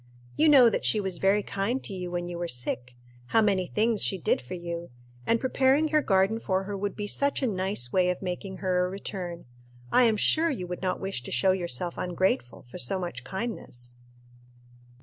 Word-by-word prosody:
You 310 +1 +4
know 265 -5 +8
that 230 - 0
she 215 - +2
was 190 -4 -3
very 200 +2 +3
kind 210 +8 -2
to - - -4
you 180 -2 -5
when 175 0 -3
you 175 -1 -5
were 175 - -2
sick 125 -2 -3 0.3
how 225 - +3
many 190 -3 +1
things 220 +1 +1
she 195 - +1
did 175 - 0
for 125 +8 -7
you; 170 -1 -6 0.4
and 230 - +3
preparing 270 +4 +2
her 305 0 +3
garden 195 0 +2
for 190 -3 -1
her 200 +1 -5
would 200 +1 -3
be 205 - -4
such 280 +6 +1
a - - +3
nice 190 - 0
way 180 -1 +3
of 180 - -1
making 190 +1 -5
her 180 -1 +2
a 180 - -1
return. 185 -3 -6 0.5
I 250 - +5
am 220 -2 +3
sure 320 +10 +3
you 235 - -3
would 180 0 -6
not 185 -1 -1
wish 195 -10 -3
to 120 - -8
show 130 +10 +3
yourself 175 -2 -2
ungrateful 175 -11 -1
for - - -8
so 130 +10 -1
much 175 -9 -5
kindness." 125 - -6
190 Hz, 210 wpm, -27 LUFS, 175-215 Hz, 0.5 s, know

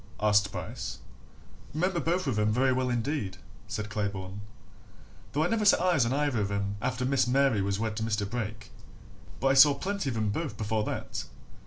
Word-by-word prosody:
asked 105 -1 +3
Bryce. - - -5 0.8
"Remember 180 +2 +1
both 170 +2 0
of 125 -7 0
'em 105 0 +2
very 130 +3 +3
well 130 0 0
indeed," 120 -5 -2 0.3
said 105 -1 -4
Claybourne, 100 -1 -3 0.9
"though 150 +6 +1
I - - +2
never 220 +2 0
set 205 - +6
eyes 170 -9 +3
on - - -1
either 110 -9 0 0.2
after 125 0 -1
Miss 130 -2 +2
Mary 130 -4 +3
was 100 0 0
wed 110 0 -2
to 110 - -1
Mr. 105 -2 -1
Brake. 110 -2 -5 0.7
But 135 - +1
I - - +4
saw 140 +1 +8
plenty 190 0 -2
of 115 - -3
'em 110 -1 0
both 140 +3 -3
before 110 -1 -1
that. - - -4
120 Hz, 180 wpm, -29 LUFS, 105-140 Hz, 0.9 s, saw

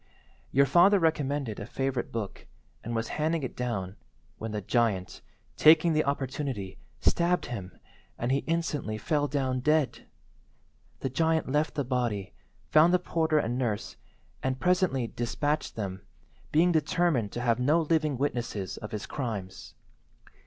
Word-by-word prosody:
Your 140 +1 +5
father 175 +8 +6
recommended 145 - 0
a 100 - -6
favourite 135 -1 -2
book, 110 -4 -5 0.4
and 115 +1 -4
was 115 0 -2
handing 160 0 +1
it 130 - -4
down, 105 -6 -3 0.4
when 110 0 -4
the 105 - -2
giant, 105 -3 0 0.4
taking 160 +2 +6
the 155 0 +2
opportunity, 135 -8 -3 0.2
stabbed 175 +1 +2
him, 100 -7 -7 0.4
and 120 +2 -1
he 135 - +3
instantly 155 -9 -1
fell 145 +6 0
down 130 -2 -1
dead. 150 +1 +1 0.9
The 135 - -2
giant 160 0 +1
left 150 +2 +1
the 145 - 0
body, 120 -6 -1 0.3
found 165 +4 +5
the - - +6
porter 160 -3 0
and 120 -3 0
nurse, 110 -5 -2 0.5
and 130 0 -1
presently 180 -8 +2
despatched 145 +6 -2
them, 95 -3 -4 0.5
being 170 +4 +4
determined 155 - +1
to 120 - -3
have 120 -1 +2
no 150 +7 +3
living 155 -3 +1
witnesses 120 -7 -2
of 105 +1 -8
his 105 - -3
crimes. 105 -9 -5
135 Hz, 145 wpm, -28 LUFS, 115-155 Hz, 0.9 s, father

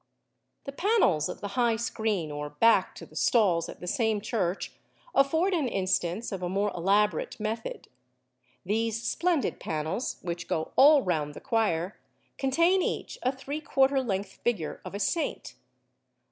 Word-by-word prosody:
The 275 - -6
panels 275 - +2
of - - -7
the 205 - -4
high 235 +2 +2
screen 220 -7 -2
or 145 0 -4
back 230 +11 +3
to - - -9
the - - -19
stalls 195 -9 +2
at - - -10
the - - -6
same 220 +3 +1
church 200 -4 -2 0.4
afford 320 +8 +3
an 315 -7 +1
instance 185 0 -1
of 195 -2 -4
a 180 - -2
more 200 +2 0
elaborate 200 +6 +1
method. 225 - -4 0.8
These 225 +3 -1
splendid 340 -5 0
panels, 160 +9 -3
which 170 -1 -4
go 160 - -2
all 285 0 +7
round 150 -5 -1
the - - -7
choir, 205 -7 0 0.4
contain 335 +8 +3
each - - -3
a 255 - +1
three 280 +3 -6
quarter 270 -3 +2
length 195 -5 -3
figure 195 -11 -1
of - - -7
a - - -3
saint. 320 - -2
215 Hz, 155 wpm, -28 LUFS, 180-265 Hz, 0.8 s, all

